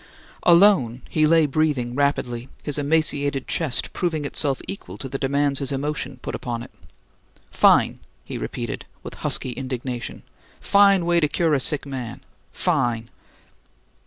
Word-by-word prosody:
Alone, 170 - +4
he 155 -1 +3
lay 165 0 +5
breathing 140 -4 0
rapidly, 125 -3 -1
his 145 0 0
emaciated 145 -2 +1
chest 145 -7 0
proving 160 -5 -1
itself 140 -1 0
equal 95 0 -6
to 135 - -6
the 135 +1 -5
demands 140 0 0
his 140 -1 -2
emotion 140 -1 -3
put - - -4
upon 120 -1 -4
it. - - -12 0.8
"Fine!" - - +4 0.3
he - - -6
repeated, - - -5 0.2
with - - -7
husky 130 - 0
indignation. 125 -1 -5 0.4
"Fine 200 -3 +4
way 170 0 +3
to 150 - +3
cure 160 +1 +1
a 140 - +3
sick 145 +2 0
man! 125 -4 -6 0.3
Fine!" 120 -9 -1
140 Hz, 140 wpm, -23 LUFS, 125-155 Hz, 0.8 s, lay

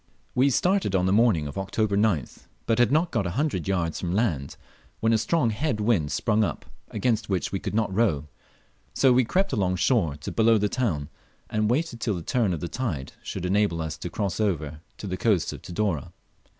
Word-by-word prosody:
We 130 +3 +4
started 180 - +1
on 90 -1 +2
the 95 - +2
morning 105 -8 +3
of 70 +5 -5
October 100 +2 0
9th, 100 - 0 0.2
but 115 0 +1
had 120 0 +4
not 160 +4 +2
got 100 - 0
a 85 - -4
hundred 140 - -1
yards 85 -4 -1
from 90 0 -2
land, 85 - -1 0.4
when 115 +1 +2
a - - +5
strong 150 -3 +1
head 120 +1 -1
wind 105 -10 +1
sprung 105 +7 +1
up, 80 -8 -3 0.2
against 115 -4 -1
which 95 -3 -1
we 95 - -2
could - - -4
not 110 -4 0
row, 95 -9 +1 0.7
so 130 -2 +5
we 130 +1 +4
crept 190 - 0
along 95 -3 +1
shore 90 - +2
to - - -5
below 115 0 +4
the 105 0 +1
town, 85 - -1 0.4
and 105 0 +1
waited 125 -2 -1
till 110 - 0
the 85 - -5
turn 115 +1 +1
of 85 -4 -3
the 85 - -2
tide 85 - -4
should - - -5
enable 95 -2 +1
us 80 -1 -3
to - - -5
cross 100 -2 -2
over 80 -8 -1 0.2
to - - -8
the 95 -1 -3
coast 100 -6 +1
of - - -9
Tidore. 90 -5 -2
105 Hz, 210 wpm, -26 LUFS, 85-115 Hz, 0.7 s, a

